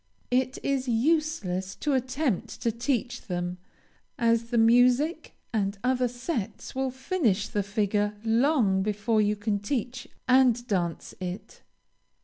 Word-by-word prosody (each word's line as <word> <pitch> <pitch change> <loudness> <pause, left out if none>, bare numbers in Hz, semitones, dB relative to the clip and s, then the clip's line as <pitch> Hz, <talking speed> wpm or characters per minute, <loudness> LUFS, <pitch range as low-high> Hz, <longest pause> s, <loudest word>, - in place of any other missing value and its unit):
It 255 +1 +1
is 270 -2 0
useless 230 - 0
to 295 - -1
attempt 260 - -1
to 230 - +2
teach 240 +1 -2
them, 175 -1 -3 0.6
as 230 0 +2
the 235 +1 -2
music, 245 +7 +3 0.2
and 200 -2 0
other 250 0 +2
sets, 245 - -4
will 265 0 -1
finish 255 - 0
the 205 - -1
figure 205 0 0
long 230 -4 +3
before 210 +2 +1
you 210 0 +2
can 205 0 -1
teach 245 +3 -3 0.2
and 250 -2 +4
dance 180 -7 -2
it. 185 +1 -7
230 Hz, 130 wpm, -27 LUFS, 205-255 Hz, 0.6 s, and